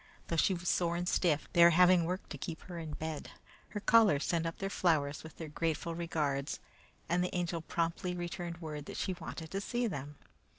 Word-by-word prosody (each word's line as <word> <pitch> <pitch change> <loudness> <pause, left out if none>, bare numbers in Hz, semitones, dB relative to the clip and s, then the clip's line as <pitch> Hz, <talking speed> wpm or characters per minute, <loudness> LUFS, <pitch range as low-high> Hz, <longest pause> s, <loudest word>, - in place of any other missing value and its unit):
Though 170 - 0
she 185 +4 +3
was 175 0 -6
sore 170 -1 +2
and 175 +1 -2
stiff, 160 -5 +2
they 170 - +7
were 170 - +10
having 180 0 +6
work 180 +3 -3
to - - -5
keep 165 -3 -5
her 175 -2 -7
in 160 -2 -5
bed. 160 0 -4 0.4
Her 205 - -4
callers 205 -9 +5
sent 165 -1 +1
up 165 - -5
their 195 - -2
flowers 150 -6 +1
with 160 - -11
their 160 - -5
grateful 165 +2 -1
regards, 150 -5 -1 0.5
and 175 +2 +2
the 180 - -2
Angel 175 -2 -1
promptly 170 +2 -1
returned 175 -1 -4
word 150 -2 -6
that - - -6
she 190 - -1
wanted 160 -2 -7
to 195 - -2
see 240 +4 -1
them. 145 - -4
170 Hz, 210 wpm, -33 LUFS, 160-180 Hz, 0.5 s, were